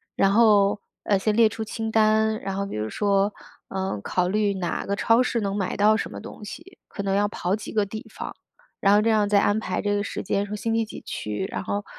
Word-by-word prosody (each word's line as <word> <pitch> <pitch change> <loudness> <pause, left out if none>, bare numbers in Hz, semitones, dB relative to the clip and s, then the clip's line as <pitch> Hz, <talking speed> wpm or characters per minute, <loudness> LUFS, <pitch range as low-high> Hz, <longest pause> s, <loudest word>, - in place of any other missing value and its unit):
然 195 - +3
后， 205 -2 +5 0.2
呃， 200 -2 +2
先 210 +2 +1
列 225 -1 +6
出 225 0 -5
清 225 +1 -4
单， 220 0 +3
然 195 0 -4
后 200 +1 -1
比 195 - -5
如 105 +1 -2
说， 200 - +1 0.4
嗯， 190 - -2
考 180 - 0
虑 205 0 +1
哪 180 -3 -3
个 200 - -1
超 230 +3 +4
市 240 -2 0
能 200 -1 -2
买 190 -2 -2
到 215 +1 +4
什 - - -3
么 - - -7
东 210 - -10
西。 365 - -10
可 200 - -6
能 195 -1 0
要 205 +1 +3
跑 190 -2 -1
几 215 - -7
个 210 -2 +2
地 215 +5 -7
方， - - -6 0.4
然 200 0 +4
后 205 - +5
这 225 - +2
样 215 -2 +3
再 205 0 +4
安 205 +2 +2
排 185 -4 -2
这 205 0 0
个 205 - 0
时 - - -4
间， 200 +1 0
说 210 - -5
星 225 +2 -1
期 225 -1 +1
几 - - -9
去。 105 - -4
然 - - -3
后 205 0 -2
205 Hz, 265 characters per minute, -24 LUFS, 195-220 Hz, 0.4 s, 列